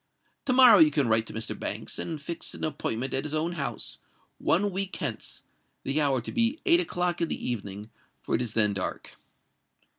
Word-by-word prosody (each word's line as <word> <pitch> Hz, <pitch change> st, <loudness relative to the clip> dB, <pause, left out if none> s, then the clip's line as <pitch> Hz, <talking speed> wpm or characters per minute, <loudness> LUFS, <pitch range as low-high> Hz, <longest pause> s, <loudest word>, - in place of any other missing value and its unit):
To 255 Hz, -, +2 dB
morrow 250 Hz, -5 st, +8 dB
you 160 Hz, -2 st, +8 dB
can 145 Hz, -3 st, +1 dB
write 110 Hz, 0 st, +2 dB
to -, -, -9 dB
Mr. 110 Hz, +1 st, -3 dB
Banks, -, -, -4 dB
and 160 Hz, -3 st, -4 dB
fix 165 Hz, +3 st, -5 dB
an -, -, -8 dB
appointment 130 Hz, -5 st, -2 dB
at 135 Hz, -, 0 dB
his 155 Hz, 0 st, -3 dB
own 160 Hz, +3 st, 0 dB
house—one 175 Hz, +4 st, -3 dB
week 190 Hz, +1 st, -3 dB
hence—the 140 Hz, +3 st, -5 dB
hour 135 Hz, -4 st, +2 dB
to -, -, -6 dB
be 235 Hz, +6 st, +1 dB
eight 345 Hz, -2 st, +6 dB
o'clock 175 Hz, -, 0 dB
in 170 Hz, -, +2 dB
the -, -, -4 dB
evening, 105 Hz, -2 st, -5 dB, 0.3 s
for -, -, -3 dB
it -, -, +2 dB
is 120 Hz, -3 st, -3 dB
then 105 Hz, -2 st, +3 dB
dark." 95 Hz, -2 st, -5 dB
155 Hz, 185 wpm, -27 LUFS, 115-180 Hz, 0.3 s, morrow